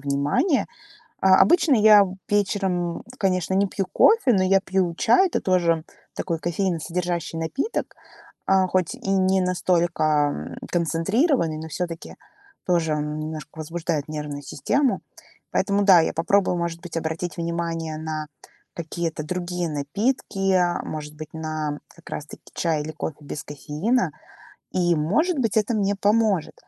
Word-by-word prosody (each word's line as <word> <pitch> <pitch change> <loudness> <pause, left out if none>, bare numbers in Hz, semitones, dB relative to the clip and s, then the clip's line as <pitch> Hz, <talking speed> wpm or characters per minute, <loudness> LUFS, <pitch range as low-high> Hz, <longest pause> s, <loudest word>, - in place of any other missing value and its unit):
внимание. 145 - +1 0.5
А 190 0 +6
обычно 335 -4 +5
я 210 -2 +7 0.2
вечером, 190 -4 0
м, - - -12 0.2
конечно, 185 -1 0
не 200 +1 +3
пью 195 -1 -2
кофе, 430 - +5
но 190 -3 +3
я 195 +1 +4
пью 185 -3 0
чай. 380 +12 +4
Это - - -1
тоже 170 -3 +1 0.3
такой 165 -3 -2
кофеиносодержащий 175 -1 -2
напиток, 260 - -3 0.5
а, 190 -1 +4
хоть 185 -2 0
и 195 - -5
не 190 0 +3
настолько, 175 -2 +1 0.2
ам, 145 - -5 0.2
концентрированный, 170 - +1
но 160 0 -7
всё-таки 165 +1 -5 0.5
тоже 165 -4 +2
он 150 +1 -3
немножко 155 0 -7
возбуждает 160 -1 -3
нервную 150 -2 -5
систему. 270 - 0 0.5
Поэтому, 200 0 +1
да, 185 -4 +8
я 160 - 0
попробую, 180 +2 +2
может 170 0 -3
быть, 170 -2 -7
обратить 160 +1 -3
внимание 165 -2 -3
на 155 -1 -4 0.5
какие-то 165 -1 -4
другие 180 0 -3
напитки, 195 - -1
а 175 -2 +2
может 150 -1 -6
быть, 155 0 -9
на 155 -2 -3 0.2
как 170 - -15
раз 150 - -4
таки - - -12
чай 160 -3 0
или 155 +1 -6
кофе 155 - -5
без 145 +1 -6
кофеина, 155 - -1 0.6
и, 175 -2 +2
может 275 - +1
быть, 225 -4 0
это 220 +2 0
мне 200 -1 +1
поможет. 205 -4 +1
175 Hz, 145 wpm, -24 LUFS, 160-195 Hz, 0.6 s, да